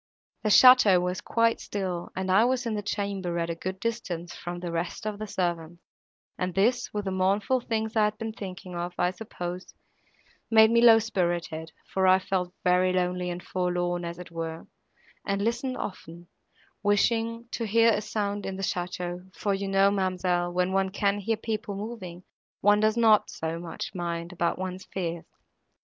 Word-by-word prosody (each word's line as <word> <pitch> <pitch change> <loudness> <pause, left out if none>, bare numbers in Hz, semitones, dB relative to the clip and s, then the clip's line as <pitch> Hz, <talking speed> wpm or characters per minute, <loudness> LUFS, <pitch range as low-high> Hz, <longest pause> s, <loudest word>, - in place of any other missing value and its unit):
The 215 - 0
château 215 -4 +8
was 180 +1 -2
quite 230 0 +1
still, 185 -4 -4
and 190 0 -1
I 200 +4 +6
was 250 0 +1
in 230 - -1
the 210 - -2
chamber 200 -3 -2
at 170 0 -1
a - - -1
good 185 +3 -5
distance 190 -7 -3
from 175 0 -6
the 175 -1 -5
rest 170 +4 -3
of 210 -1 -3
the 215 - -4
servants, 175 -3 -3 0.6
and 180 -1 -2
this, 230 +6 +2
with 210 -1 -3
the 190 - -1
mournful 195 +7 +1
things 220 -1 -2
I 215 -1 +4
had 210 0 -2
been 225 0 -4
thinking 185 -3 -8
of, 175 +1 -4
I 180 0 +2
suppose, 180 -2 -7 0.7
made 220 0 +7
me 235 0 +4
low 230 -2 +8
spirited, 175 -7 -2 0.2
for 190 -1 +3
I 185 0 +7
felt 185 -1 -2
very 180 +1 +3
lonely 180 0 0
and 175 0 -5
forlorn, 175 -1 -1
as 170 0 -5
it 180 -1 -10
were, 165 -1 -5 0.6
and 200 0 -1
listened 240 +3 -1
often, 170 -2 -7 0.5
wishing 230 +3 +1
to 230 - -3
hear 230 +2 +5
a 210 - 0
sound 205 -1 -3
in 195 - -4
the 195 - -5
château, 180 0 -4
for 200 - -1
you 195 0 -2
know, 195 +1 +4
ma'amselle, 185 -2 0
when 180 +1 0
one 195 0 +2
can 200 +1 0
hear 220 +2 -1
people 215 -2 -4
moving, 195 -4 -7 0.4
one 205 +1 +5
does 215 +1 +2
not 220 -2 +5
so 165 +1 -4
much 170 +1 -6
mind, 170 -1 -4
about 170 -1 0
one's 185 0 -5
fears. 170 -3 -4
190 Hz, 180 wpm, -27 LUFS, 175-215 Hz, 0.7 s, château